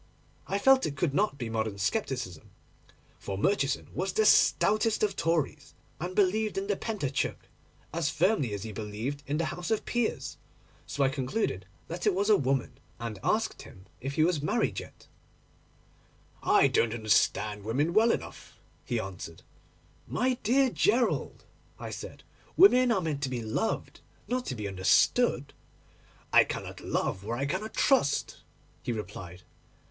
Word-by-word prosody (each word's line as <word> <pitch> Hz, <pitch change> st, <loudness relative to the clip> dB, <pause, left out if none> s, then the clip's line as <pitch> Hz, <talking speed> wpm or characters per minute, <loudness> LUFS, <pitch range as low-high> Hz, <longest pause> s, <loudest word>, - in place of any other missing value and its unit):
I 195 Hz, -, 0 dB
felt 265 Hz, +5 st, +5 dB
it 140 Hz, -2 st, -6 dB
could 145 Hz, -1 st, 0 dB
not 200 Hz, -2 st, +1 dB
be 120 Hz, -4 st, -4 dB
modern 110 Hz, -2 st, -2 dB
scepticism, 120 Hz, -, -2 dB, 0.7 s
for 95 Hz, -1 st, -5 dB
Murchison 140 Hz, -, +1 dB
was 185 Hz, +3 st, -2 dB
the 215 Hz, +3 st, +2 dB
stoutest 215 Hz, +1 st, +4 dB
of 205 Hz, -2 st, +1 dB
Tories, 155 Hz, -3 st, -1 dB, 0.2 s
and 180 Hz, +3 st, -4 dB
believed 210 Hz, +2 st, +2 dB
in 195 Hz, -, -1 dB
the 205 Hz, 0 st, 0 dB
Pentateuch 190 Hz, -, -3 dB, 0.5 s
as 165 Hz, -3 st, 0 dB
firmly 170 Hz, -, +1 dB
as 100 Hz, -, -6 dB
he 110 Hz, -, -6 dB
believed 110 Hz, +7 st, -4 dB
in 145 Hz, +2 st, -1 dB
the 165 Hz, -, 0 dB
House 175 Hz, +3 st, -5 dB
of 220 Hz, -2 st, 0 dB
Peers; 240 Hz, -2 st, -2 dB, 0.5 s
so 140 Hz, -, 0 dB
I 135 Hz, -, +4 dB
concluded 130 Hz, -, -2 dB, 0.2 s
that 175 Hz, +4 st, -3 dB
it 200 Hz, -, +3 dB
was 200 Hz, +3 st, +2 dB
a -, -, +8 dB
woman, 135 Hz, -4 st, -1 dB, 0.2 s
and 115 Hz, -3 st, -5 dB
asked -, -, 0 dB
him 95 Hz, -, -14 dB
if 135 Hz, +2 st, -5 dB
he 155 Hz, -, +3 dB
was 165 Hz, -3 st, +1 dB
married 150 Hz, -, 0 dB
yet. -, -, -12 dB, 1.4 s
'I -, -, +4 dB
don't 115 Hz, 0 st, +1 dB
understand 105 Hz, -1 st, +1 dB
women 140 Hz, +10 st, 0 dB
well 225 Hz, +4 st, +5 dB
enough,' -, -, -6 dB, 0.3 s
he -, -, -1 dB
answered. -, -, -7 dB, 0.6 s
'My 255 Hz, +1 st, +1 dB
dear 260 Hz, +3 st, +3 dB
Gerald,' 235 Hz, +3 st, +1 dB, 0.3 s
I -, -, -7 dB
said, -, -, -8 dB, 0.3 s
'women 255 Hz, -10 st, +7 dB
are 195 Hz, -5 st, +2 dB
meant 155 Hz, -4 st, -2 dB
to 135 Hz, -, -1 dB
be 125 Hz, -2 st, -3 dB
loved, 110 Hz, -, -2 dB, 0.3 s
not 250 Hz, 0 st, -2 dB
to 130 Hz, -, -3 dB
be 105 Hz, -3 st, -4 dB
understood.' 100 Hz, -, +2 dB, 0.8 s
'I -, -, +8 dB
cannot -, -, -6 dB
love 95 Hz, -, -2 dB
where 115 Hz, +3 st, -3 dB
I 135 Hz, -, -1 dB
cannot 190 Hz, +9 st, -3 dB
trust,' 265 Hz, -, +2 dB, 0.4 s
he -, -, -3 dB
replied. 90 Hz, -5 st, -7 dB
145 Hz, 155 wpm, -29 LUFS, -, 1.4 s, a